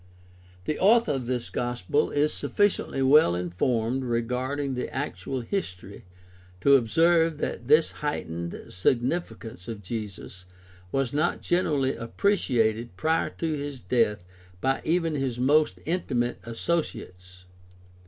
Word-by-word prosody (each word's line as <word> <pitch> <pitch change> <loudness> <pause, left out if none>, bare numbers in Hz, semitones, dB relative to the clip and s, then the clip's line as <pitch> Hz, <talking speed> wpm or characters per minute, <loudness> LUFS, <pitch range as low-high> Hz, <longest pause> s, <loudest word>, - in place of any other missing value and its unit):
The 155 - -2
author 220 -2 +5
of 130 -4 -3
this 125 -1 -2
Gospel 120 +3 0
is 145 +1 +1
sufficiently 205 -9 0
well 130 - +6
informed 115 +8 -1
regarding 125 +4 -1
the 125 - -4
actual 135 -1 -4
history 100 - -5 0.6
to 140 +5 +6
observe 165 +6 +3
that 120 -4 -4
this 155 +3 +5
heightened 85 - -4
significance 120 - -1
of 110 -3 -6
Jesus 100 -3 -7 0.5
was 135 -2 0
not 155 +4 0
generally 145 -7 +1
appreciated 115 - 0
prior 160 +6 +1
to 165 -1 -3
his 145 -2 -4
death 105 -1 +1 0.4
by 135 +4 0
even 165 -1 +1
his 135 -4 -2
most 145 +5 +3
intimate 125 -8 -1
associates 110 - -4
(e. - - -26
130 Hz, 120 wpm, -26 LUFS, 115-150 Hz, 0.6 s, well